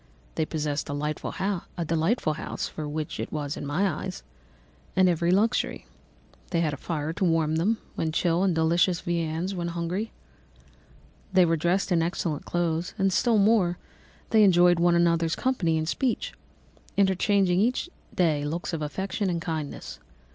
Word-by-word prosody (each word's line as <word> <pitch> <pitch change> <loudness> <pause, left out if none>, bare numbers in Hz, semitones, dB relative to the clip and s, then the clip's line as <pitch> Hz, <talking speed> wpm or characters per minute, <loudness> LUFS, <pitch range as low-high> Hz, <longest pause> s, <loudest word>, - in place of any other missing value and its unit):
They 160 -1 -1
possessed 150 -2 -2
a - - -2
delightful 150 +1 -3
house 170 -2 -2
(for 150 -2 -6
such 155 0 -4
it - - -4
was 145 -1 -3
in - - -6
my 165 +8 +1
eyes) 190 -1 -4 0.7
and 185 0 +5
every 170 -1 +1
luxury; 215 +6 +1 0.6
they 170 -2 +1
had 155 -3 0
a - - -4
fire 155 +1 -3
to 185 - -3
warm 165 -3 +2
them 210 +7 +2 0.2
when 160 - -1
chill 170 +1 +1
and 190 -3 +2
delicious 170 +2 +2
viands 170 +2 -2
when 175 -2 -3
hungry; 175 +6 -3 1.2
they 185 -1 +5
were 165 0 +2
dressed 175 +5 0
in 170 -2 +3
excellent 165 -2 -2
clothes; 170 -1 -1
and, 195 -2 +2
still 225 +4 +3
more, 200 -4 +3 0.5
they 220 -1 +6
enjoyed 175 -2 +5
one 175 0 +4
another's 170 -1 +2
company 185 -12 +1
and 155 0 -2
speech, 250 +7 -1 0.6
interchanging 190 -1 +3
each 245 - +1 0.2
day 155 -5 +1
looks 165 +4 -3
of 160 - -2
affection 190 +6 -2
and 170 -1 -1
kindness. 160 -4 -5
170 Hz, 155 wpm, -26 LUFS, 160-190 Hz, 1.2 s, they